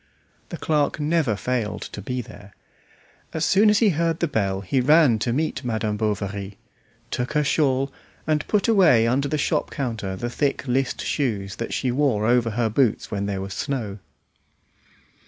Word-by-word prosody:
The -, -, -5 dB
clerk 150 Hz, -1 st, 0 dB
never 150 Hz, -6 st, +1 dB
failed 115 Hz, -1 st, -2 dB
to 100 Hz, -, -8 dB
be 125 Hz, +5 st, -3 dB
there. 100 Hz, -4 st, -13 dB, 0.8 s
As 160 Hz, -1 st, +1 dB
soon 205 Hz, +6 st, +5 dB
as 210 Hz, -, +4 dB
he 220 Hz, -1 st, +4 dB
heard 165 Hz, -1 st, 0 dB
the 170 Hz, -, +1 dB
bell 100 Hz, -8 st, -1 dB
he 115 Hz, +7 st, 0 dB
ran 145 Hz, -4 st, +5 dB
to 120 Hz, -, -1 dB
meet 140 Hz, +1 st, -1 dB
Madame 110 Hz, -3 st, -1 dB
Bovary, 100 Hz, -2 st, -3 dB, 0.5 s
took 125 Hz, +4 st, -2 dB
her 150 Hz, 0 st, +2 dB
shawl, 135 Hz, -2 st, +1 dB, 0.3 s
and 155 Hz, -1 st, 0 dB
put 210 Hz, +1 st, +1 dB
away 175 Hz, -, +5 dB
under 130 Hz, +4 st, +1 dB
the 150 Hz, -, -1 dB
shop 145 Hz, -, 0 dB
counter 115 Hz, -8 st, -3 dB
the 105 Hz, +6 st, -4 dB
thick 140 Hz, +2 st, -1 dB
list 130 Hz, +1 st, -1 dB
shoes 100 Hz, -9 st, -2 dB
that 115 Hz, -, -4 dB
she 130 Hz, -, -1 dB
wore 125 Hz, -6 st, +1 dB
over 120 Hz, 0 st, +3 dB
her 115 Hz, +1 st, 0 dB
boots 110 Hz, +1 st, +1 dB
when 100 Hz, 0 st, -2 dB
there 100 Hz, -2 st, -2 dB
was 95 Hz, 0 st, -5 dB
snow. 110 Hz, -5 st, -3 dB
125 Hz, 175 wpm, -23 LUFS, 105-150 Hz, 0.8 s, soon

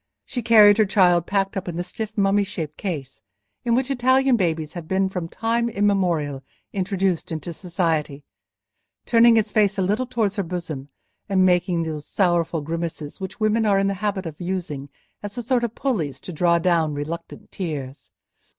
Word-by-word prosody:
She 250 Hz, -2 st, -4 dB
carried 215 Hz, -2 st, +7 dB
her 215 Hz, -, +6 dB
child 180 Hz, -4 st, +3 dB
packed 195 Hz, 0 st, 0 dB
up 190 Hz, -1 st, -4 dB
in 175 Hz, -, -4 dB
the 175 Hz, -, -2 dB
stiff 220 Hz, +3 st, -6 dB
mummy 200 Hz, 0 st, +3 dB
shaped 155 Hz, -6 st, -5 dB
case 150 Hz, -10 st, -5 dB, 0.4 s
in 235 Hz, -1 st, +2 dB
which 260 Hz, +2 st, 0 dB
Italian 260 Hz, 0 st, +3 dB
babies 160 Hz, -6 st, -1 dB
have 170 Hz, -3 st, -7 dB
been 190 Hz, +1 st, +1 dB
from 180 Hz, -3 st, -4 dB
time 230 Hz, +5 st, -1 dB
immemorial 180 Hz, -10 st, 0 dB, 0.3 s
introduced 190 Hz, -3 st, -1 dB
into 160 Hz, +1 st, -4 dB
society, 160 Hz, -5 st, -2 dB, 0.8 s
turning 230 Hz, -1 st, +6 dB
its 215 Hz, -1 st, +1 dB
face 205 Hz, -2 st, +2 dB
a 190 Hz, -, +1 dB
little 210 Hz, +7 st, 0 dB
towards 220 Hz, -4 st, -1 dB
her -, -, +2 dB
bosom, 165 Hz, -6 st, -5 dB, 0.4 s
and 190 Hz, -1 st, +3 dB
making 180 Hz, -1 st, +2 dB
those 155 Hz, -2 st, -5 dB
sorrowful 175 Hz, -4 st, +1 dB
grimaces 165 Hz, 0 st, -5 dB
which 190 Hz, +2 st, -6 dB
women 215 Hz, +1 st, +2 dB
are 205 Hz, -2 st, +3 dB
in 195 Hz, -, +2 dB
the 195 Hz, -, +1 dB
habit 200 Hz, -3 st, -1 dB
of 160 Hz, -1 st, -7 dB
using 175 Hz, -6 st, -4 dB, 0.3 s
as 205 Hz, +3 st, -7 dB
a 240 Hz, -, -3 dB
sort 245 Hz, +1 st, +1 dB
of 235 Hz, -1 st, -2 dB
pulleys 185 Hz, -, -2 dB
to 180 Hz, -, -8 dB
draw 170 Hz, +2 st, +3 dB
down 165 Hz, -3 st, +1 dB
reluctant 165 Hz, +4 st, -6 dB
tears. 140 Hz, -, -5 dB
185 Hz, 180 wpm, -23 LUFS, 165-210 Hz, 0.8 s, carried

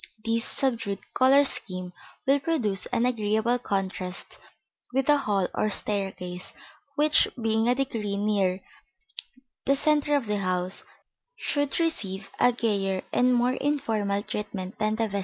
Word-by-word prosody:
This 230 Hz, 0 st, +1 dB
subdued 230 Hz, -7 st, -1 dB, 0.2 s
color 270 Hz, +2 st, +6 dB
scheme 185 Hz, -8 st, -4 dB, 0.3 s
will 275 Hz, +1 st, +4 dB
produce 245 Hz, -11 st, 0 dB
an 240 Hz, -1 st, +1 dB
agreeable 225 Hz, 0 st, +1 dB
contrast 190 Hz, -4 st, -3 dB, 0.5 s
with 265 Hz, +1 st, +1 dB
the 295 Hz, -, +5 dB
hall 200 Hz, -8 st, +1 dB
or 215 Hz, -, +1 dB
staircase, 190 Hz, -3 st, -3 dB, 0.4 s
which, 300 Hz, +1 st, +4 dB
being 225 Hz, 0 st, +1 dB
a 250 Hz, -, +4 dB
degree 225 Hz, -7 st, -1 dB
nearer 200 Hz, -3 st, +1 dB, 1.0 s
the 275 Hz, -, +4 dB
centre 295 Hz, 0 st, +2 dB
of 280 Hz, -4 st, +1 dB
the 210 Hz, -1 st, -1 dB
house, 185 Hz, 0 st, -1 dB, 0.5 s
should 285 Hz, -, -1 dB
receive 200 Hz, -, -2 dB
a 245 Hz, -, +6 dB
gayer 200 Hz, -5 st, 0 dB
and 250 Hz, +1 st, +4 dB
more 245 Hz, +1 st, +3 dB
informal 220 Hz, -9 st, 0 dB
treatment 205 Hz, -3 st, -5 dB
than 215 Hz, 0 st, +1 dB
the 225 Hz, -, 0 dB
vestibule. 200 Hz, -2 st, -1 dB
220 Hz, 140 wpm, -27 LUFS, 195-260 Hz, 1.0 s, color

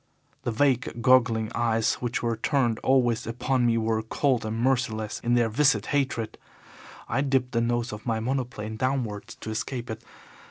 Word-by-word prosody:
The 120 Hz, -, 0 dB
vague, 125 Hz, 0 st, +1 dB
goggling 115 Hz, -4 st, +4 dB
eyes 115 Hz, -1 st, +1 dB
which 120 Hz, -1 st, -2 dB
were 115 Hz, -1 st, 0 dB
turned 120 Hz, -1 st, +1 dB
always 125 Hz, -4 st, +2 dB
upon 125 Hz, +1 st, 0 dB
me 115 Hz, -1 st, +2 dB
were 110 Hz, 0 st, 0 dB
cold 125 Hz, +2 st, 0 dB
and 110 Hz, +1 st, -3 dB
merciless 115 Hz, -4 st, 0 dB
in 120 Hz, 0 st, +1 dB
their 120 Hz, -1 st, +3 dB
viscid 135 Hz, +6 st, +2 dB
hatred. 130 Hz, -6 st, -1 dB, 0.7 s
I 130 Hz, -, 0 dB
dipped 135 Hz, -2 st, +1 dB
the 115 Hz, -, +1 dB
nose 120 Hz, +1 st, 0 dB
of 105 Hz, -, -8 dB
my 115 Hz, -1 st, +1 dB
monoplane 120 Hz, -3 st, -3 dB
downwards 125 Hz, -5 st, -2 dB
to 110 Hz, -, -7 dB
escape 120 Hz, +2 st, -4 dB
it. 110 Hz, +1 st, -7 dB
120 Hz, 165 wpm, -26 LUFS, 110-130 Hz, 0.7 s, goggling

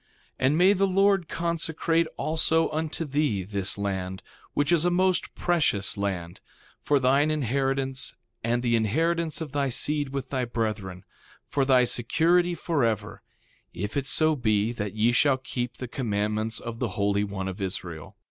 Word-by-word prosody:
3:2 130 Hz, -, +3 dB
And 150 Hz, +3 st, +2 dB
may 185 Hz, +3 st, +6 dB
the 195 Hz, 0 st, +2 dB
Lord 195 Hz, -2 st, +2 dB
consecrate 165 Hz, 0 st, 0 dB
also 160 Hz, +1 st, +1 dB
unto 160 Hz, +1 st, -2 dB
thee 140 Hz, -9 st, 0 dB
this 100 Hz, +1 st, -2 dB
land, 95 Hz, -2 st, -3 dB, 0.3 s
which 145 Hz, +3 st, +1 dB
is 170 Hz, -2 st, +4 dB
a 175 Hz, -, +3 dB
most 185 Hz, 0 st, +1 dB
precious 150 Hz, -, +1 dB
land, 95 Hz, -4 st, -3 dB, 0.4 s
for 145 Hz, -1 st, +2 dB
thine 135 Hz, +4 st, +3 dB
inheritance 135 Hz, -1 st, -1 dB, 0.3 s
and 120 Hz, +2 st, 0 dB
the 120 Hz, -1 st, +2 dB
inheritance 160 Hz, +9 st, 0 dB
of 155 Hz, -4 st, -5 dB
thy 140 Hz, -1 st, 0 dB
seed 145 Hz, +3 st, 0 dB
with 135 Hz, 0 st, -4 dB
thy 130 Hz, -2 st, 0 dB
brethren, 105 Hz, -6 st, -3 dB, 0.4 s
for 140 Hz, -2 st, 0 dB
thy 130 Hz, -2 st, +5 dB
security 170 Hz, +9 st, +2 dB
forever, 115 Hz, -, -1 dB, 0.5 s
if 100 Hz, +4 st, -4 dB
it 140 Hz, -1 st, -1 dB
so 155 Hz, +1 st, +3 dB
be 110 Hz, -4 st, +1 dB
that 105 Hz, -4 st, -4 dB
ye 110 Hz, +2 st, +3 dB
shall 135 Hz, +2 st, +3 dB
keep 125 Hz, -2 st, -4 dB
the 125 Hz, -, -5 dB
commandments 110 Hz, -2 st, -2 dB
of 115 Hz, -1 st, -7 dB
the 115 Hz, -8 st, -3 dB
Holy 100 Hz, 0 st, +1 dB
One 100 Hz, -2 st, -4 dB
of 95 Hz, +2 st, -6 dB
Israel. 90 Hz, -4 st, -5 dB
130 Hz, 160 wpm, -26 LUFS, 105-155 Hz, 0.5 s, may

